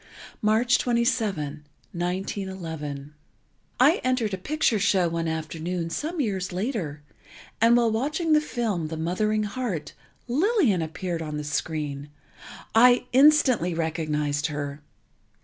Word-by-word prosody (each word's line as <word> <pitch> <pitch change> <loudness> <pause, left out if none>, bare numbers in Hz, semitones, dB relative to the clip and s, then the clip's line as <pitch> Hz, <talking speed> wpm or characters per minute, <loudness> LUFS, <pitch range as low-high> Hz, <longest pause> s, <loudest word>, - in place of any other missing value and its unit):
March 225 +3 +3
27, 205 - 0 0.3
1911 175 -5 -4 0.7
I 290 +8 +5
entered 255 -5 0
a - - -1
picture 275 -1 +1
show 190 -3 +3
one 165 0 -2
afternoon, 165 +2 -3
some 320 - -3
years 195 -8 -1
later, 180 - -3 0.6
and 230 +1 +6
while 235 -2 +3
watching 300 +8 0
the 305 - +5
film 220 - -2
"The 160 0 -5
Mothering 215 +6 0
Heart," 210 - -4 0.3
Lillian 290 - +2
appeared 165 +2 -4
on 150 -1 -4
the 150 - -4
screen. 145 -1 -3 0.6
I 245 +2 +6
instantly 260 - +5
recognized 150 -3 -1
her. 145 -1 -5
190 Hz, 115 wpm, -25 LUFS, 160-240 Hz, 0.7 s, and